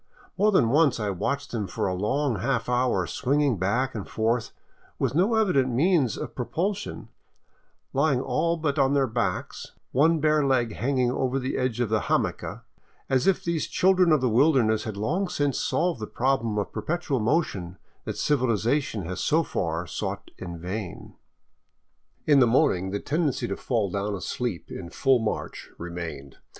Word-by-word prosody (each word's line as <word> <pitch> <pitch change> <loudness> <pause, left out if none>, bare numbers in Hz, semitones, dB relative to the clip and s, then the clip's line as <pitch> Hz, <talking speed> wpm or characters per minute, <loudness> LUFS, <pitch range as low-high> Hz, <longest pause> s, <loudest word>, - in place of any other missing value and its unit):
More 210 +2 +3
than 125 - +4
once 140 -2 +3
I 105 -2 -1
watched 140 +9 -2
them 110 -5 -2
for 90 - -3
a 95 - 0
long 115 +6 0
half 125 +1 -1
hour 125 -6 +1
swinging 140 - 0
back 120 +8 0
and 105 -4 -6
forth 115 +1 0 0.5
with - - 0
no 190 +9 +3
evident 180 -12 +2
means 140 - +2
of - - -6
propul 175 - -1
sion, 190 - -8 0.8
lying 140 -1 +2
all 155 +7 0
but 155 -2 -1
on 135 +1 +3
their 140 -1 +3
backs, 110 -6 -3 0.2
one 160 +5 +3
bare 155 0 +3
leg 125 -5 +1
hanging 125 0 0
over 130 0 0
the 130 0 -2
edge 125 -3 -1
o£ 120 -1 +1
the 110 +1 +1
hamaca, - - -2 0.5
as 130 +3 +2
if 195 - +2
these 170 -2 -1
children 185 -2 +3
of 155 -4 +4
the 130 - +2
wilderness 115 -4 +3
had 110 -3 -5
long 170 - 0
since 145 -2 0
solved 175 -7 0
the 105 - -5
problem 115 -2 0
of 105 - -2
perpetual 145 +4 -1
motion 105 - -1 0.3
that - - -4
civilization 125 -3 +1
has 90 +2 -4
so 160 +2 +2
far 85 - -2
sought - - -5
in 85 -2 -6
vain. 90 +3 -6 1.1
In 145 -2 +5
the 125 - +6
morning 115 - +2
the 100 +1 -2
tendency 150 +1 -1
to - - -2
fall 110 -7 -1
down 100 +1 -2
asleep 105 0 -4
in 85 - -7
full 130 +7 +2
march 110 -1 -4
re 85 0 -7
mained. 80 -6 -7
125 Hz, 170 wpm, -26 LUFS, 105-145 Hz, 1.1 s, the